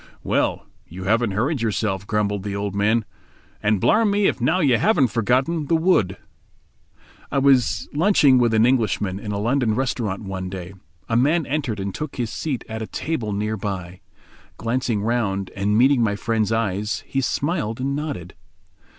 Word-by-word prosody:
"Well, - - 0 0.2
you 95 +3 -8
haven't 110 +1 +1
hurried 125 +7 0
yourself," 105 -3 -1
grumbled 105 -2 0
the 100 0 -4
old 100 -1 -3
man, 105 +3 +1 0.6
"and 105 -1 +2
blarm 215 - +3
me 205 0 +2
if 130 - +1
now 130 +9 +2
you 135 -8 +3
haven't 175 - +3
forgotten 130 +9 0
the 165 - +3
wood." 160 - +2 1.1
I - - 0
was 135 -3 +3
lunching 150 -5 +4
with 120 -2 +3
an 110 +1 +5
Englishman 105 -6 +1
in 105 0 -5
a 100 - -2
London 115 +1 +1
restaurant 115 -6 -2
one 95 -2 -5
day. 90 0 -7 0.3
A 115 - -1
man 150 +7 +3
entered 135 -8 -2
and 95 0 -3
took 150 -2 -5
his 120 -3 -3
seat 140 -6 -3
at 110 0 -5
a 110 - -4
table 125 -10 -3
near 105 +2 -2
by. 95 -3 -5 0.6
Glancing 115 -3 -1
round, 100 -5 -1
and 100 +2 +1
meeting 130 +1 +4
my 105 -3 +1
friend's 110 0 -1
eyes, 105 -1 -1
he 135 - -1
smiled 135 -5 -1
and 135 +2 -1
nodded. 140 - -5
115 Hz, 170 wpm, -22 LUFS, 100-135 Hz, 1.1 s, an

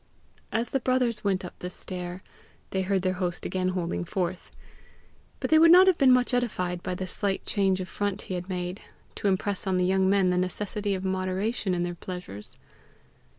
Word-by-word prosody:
As 230 +2 -1
the 270 - +1
brothers 250 -2 +1
went 190 -2 0
up - - -8
the 180 - -5
stair, 180 0 -4 0.5
they 190 - 0
heard 190 0 0
their 185 -1 +1
host 175 -1 -2
again 185 -1 -1
holding 180 -2 -2
forth; 180 0 -3 0.9
but - - -3
they 315 - +7
would 330 +1 +7
not 365 +2 +9
have 375 -3 +3
been 265 -2 +6
much 250 0 +3
edified 180 -8 -1
by 185 0 -3
the 185 - -4
slight 195 +1 -1
change 195 -2 +1
of 185 - -4
front 205 +1 -2
he - - -6
had 180 +1 -4
made 180 +1 -3 0.3
to - - -2
impress 195 0 0
on 185 -1 +2
the 180 - +2
young 190 0 +3
men 195 -2 +3
the 180 - +1
necessity 200 +2 -2
of 190 0 -5
moderation 190 +2 -1
in 175 - 0
their 175 0 -2
pleasures. 175 - -5
190 Hz, 195 wpm, -27 LUFS, 180-205 Hz, 0.9 s, not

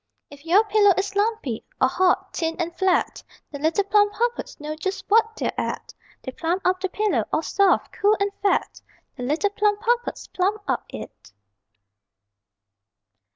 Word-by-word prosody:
_If 285 +2 -14
your 375 +6 +5
pillow 415 -3 +4
is 395 +1 -2
lumpy, 410 - -1 0.2
or 260 - +4
hot, 375 +5 +1
thin 325 -1 -1
and 340 -1 -3
flat, 380 -1 +1 0.3
The 285 - -7
little 320 +7 +1
Plumpuppets 415 +3 0
know 300 +1 -5
just 380 +5 -4
what 445 +1 +3
they're - - -2
at; - - -4 0.3
They 260 - -5
plump 340 +7 -2
up 365 0 +2
the 380 0 -2
pillow, 425 +3 0
all 315 - 0
soft, 395 +2 +2
cool 415 +1 +2
and 400 0 0
fat 400 - 0 0.3
The 265 - -9
little 305 +11 0
Plumpuppets 425 +4 0
plump 400 +3 0
up - - -1
it! - - -10
390 Hz, 155 wpm, -23 LUFS, 330-415 Hz, 0.3 s, your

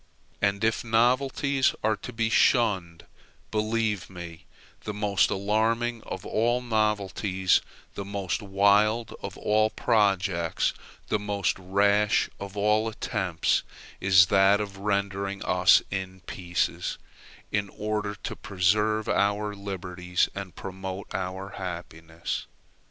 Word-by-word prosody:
And 100 +1 +1
if 110 +5 +1
novelties 130 +4 +2
are 110 0 +2
to 105 +5 -8
be 115 -1 -1
shunned, 95 -10 +2 0.5
believe 110 -3 0
me, 85 -3 -10 0.4
the 105 - -5
most 105 -2 +2
alarming 110 +4 0
of 95 - -6
all 120 +2 +1
novelties, 105 -5 +1 0.3
the 100 - -5
most 100 0 -3
wild 105 +3 +3
of - - -6
all 110 +1 +2
projects, 100 -7 +1 0.4
the 105 - +1
most 105 -1 -1
rash 100 +3 +2
of 100 0 -7
all 105 +2 +2
attempts, 95 -6 0 0.4
is 95 -2 +6
that 95 +2 +4
of 100 -2 -5
rendering 100 -1 -2
us 90 +1 +5
in 95 -1 -4
pieces, 85 0 -2 0.5
in 100 -1 -1
order 105 0 -3
to - - -4
preserve 105 +3 +1
our 105 +1 +1
liberties 90 -3 -2
and 95 -3 -7
promote 95 0 -6
our 95 +2 -4
happiness. 85 -2 -5
100 Hz, 115 wpm, -27 LUFS, 95-110 Hz, 0.5 s, is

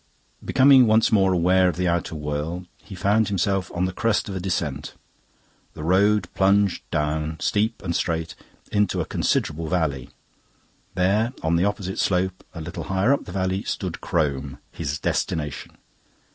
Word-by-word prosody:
Becoming 130 -2 +6
once 110 +2 +4
more 95 -3 +4
aware 90 +1 +3
of - - -3
the 90 0 0
outer 85 -1 -1
world, 75 +4 -4 0.2
he 95 - -10
found 105 +4 +2
himself 95 -1 0
on 90 +1 -1
the 95 - -3
crest 115 +2 0
of 100 - -5
a - - -2
descent. 85 -6 -3 0.8
The 75 - -7
road 100 +3 +3
plunged 100 -1 +2
down, 75 +2 -2
steep 110 +4 0
and 85 -3 -2
straight, 80 -1 -1 0.4
into 105 -2 +1
a - - -1
considerable 80 +1 -1
valley. 75 -7 -1 0.9
There, 105 +6 +1
on 80 +1 +2
the 85 +3 +2
opposite 100 -2 -3
slope, 90 0 0
a 85 - -6
little 85 +2 -6
higher 95 +8 +2
up 140 - -2
the - - -8
valley, 95 +1 -1
stood - - -4
Crome, 70 -4 -1
his 75 -3 -3
destination. 75 -3 -3
90 Hz, 160 wpm, -23 LUFS, 80-100 Hz, 0.9 s, Becoming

